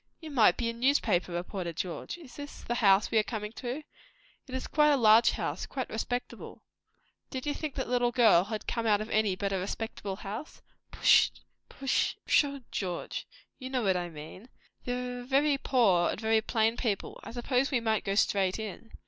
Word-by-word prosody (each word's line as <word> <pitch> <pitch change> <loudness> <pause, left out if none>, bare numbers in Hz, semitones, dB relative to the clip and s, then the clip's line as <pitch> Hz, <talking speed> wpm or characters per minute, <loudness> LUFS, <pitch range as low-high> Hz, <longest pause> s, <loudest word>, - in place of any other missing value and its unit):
"You 315 -2 -9
might 240 -6 +4
be 235 - -1
a 230 - -1
newspaper 230 -8 +1
reporter, 175 0 -4
George! 175 - -5
Is 310 -8 -14
this 290 0 -9
the 240 - -2
house 200 -4 +4
we 225 - +4
are - - +2
coming 210 -2 -5
to? 250 +5 -5 0.6
It 260 - -7
is 260 - -3
quite 300 0 +3
a 290 - +4
large 225 -1 +6
house; - - -3
quite 260 -2 -5
respectable." 245 +3 -5 0.7
"Did 260 +1 -5
you 295 - 0
think 300 -1 -5
that 265 - -3
little 245 -1 +1
girl 220 -8 +5
had 215 0 -5
come 230 -1 -2
out 205 -1 +4
of 215 +1 -6
any 215 -3 +2
but 200 +1 -2
a 190 - 0
respectable 200 0 -4
house?" 210 +9 -8 0.3
"Pshaw, 280 +1 +1
George! 180 -4 -4 0.3
you 260 -1 -6
know 255 -2 -1
what 190 -2 +2
I 175 -1 -2
mean. 160 +9 -11 0.4
They 250 0 -3
are - - -7
very 275 +2 +2
poor 200 -12 +3
and - - -3
very 220 0 +2
plain 225 0 +1
people. 210 -6 -2
I - - -8
suppose 250 +3 0
we 265 - +1
might 220 -2 0
go 195 - -1
straight 195 -2 +2
in?" 220 +1 -7
230 Hz, 190 wpm, -29 LUFS, 200-255 Hz, 0.7 s, large